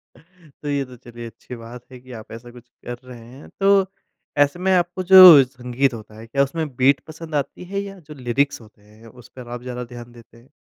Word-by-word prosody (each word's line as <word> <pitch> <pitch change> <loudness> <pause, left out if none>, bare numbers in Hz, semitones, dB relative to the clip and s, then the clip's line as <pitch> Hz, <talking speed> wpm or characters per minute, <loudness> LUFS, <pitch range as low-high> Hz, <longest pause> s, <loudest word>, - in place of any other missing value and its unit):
तो 165 -4 -16
ये 140 -1 -1
तो 125 -1 -14
चलिए 120 0 -11
अच्छी 120 +2 -11
बात 115 +1 -11
है 130 - -11
कि 130 +1 -16
आप 110 - -15
ऐसा 115 +1 -11
कुछ 120 0 -16 0.2
कर 120 0 -6
रहे 125 -2 -12
हैं। 130 +5 -14
तो 195 -1 +4 0.5
ऐसे 145 +4 +2
में 190 +1 0
आपको 180 +1 0
जो 180 -6 +10
संगीत 125 +1 -2
होता 110 -1 -11
है, 115 - -12
क्या 140 +4 +1
उसमें 150 -1 -4
बीट 130 +2 +3
पसंद 160 0 -9
आती 145 +4 -3
है 200 - -1
या 195 -1 -9
जो 155 -3 -13
लिरिक्स 130 0 -1
होते 110 -1 -20
हैं 105 +2 -19 0.2
उस - - -18
पर 125 -2 -10
आप 120 0 -7
ज़्यादा 125 0 -6
ध्यान 120 0 -10
देते 115 -1 -18
हैं? 120 +3 -22
130 Hz, 225 wpm, -21 LUFS, 120-155 Hz, 0.5 s, जो